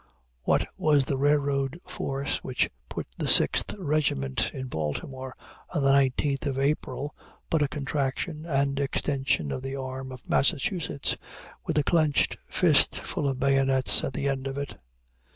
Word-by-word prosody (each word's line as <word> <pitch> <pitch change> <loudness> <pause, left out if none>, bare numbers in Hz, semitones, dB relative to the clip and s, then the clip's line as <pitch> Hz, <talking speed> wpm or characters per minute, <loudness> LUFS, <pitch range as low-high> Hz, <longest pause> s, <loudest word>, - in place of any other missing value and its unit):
What - - +2
was 145 -3 +4
the 140 - -1
railroad 140 0 +1
force 135 0 -2
which 130 -1 0 0.2
put - - -4
the - - -1
Sixth - - +4
Regiment 145 - 0
in 130 - -5
Baltimore 130 - -4 0.4
on 145 - +1
the 135 - +5
19th 140 +1 +2
of 135 -1 -2
April 140 0 -1 0.4
but 160 - +3
a 145 - +3
contraction 145 +3 -3
and 140 -2 +1
extension 135 - 0
of 130 - -3
the 135 +1 -4
arm 130 0 -5
of 130 -1 -11
Massachusetts 140 +2 +1 0.5
with - - 0
a 150 - +4
clenched 155 -2 +2
fist - - +4
full 145 - -2
of 130 -1 -3
bayonets 135 -1 +3
at 135 - -2
the 140 - -1
end 135 -1 -1
of 135 0 -4
it? 140 0 -4
135 Hz, 150 wpm, -27 LUFS, 130-145 Hz, 0.5 s, the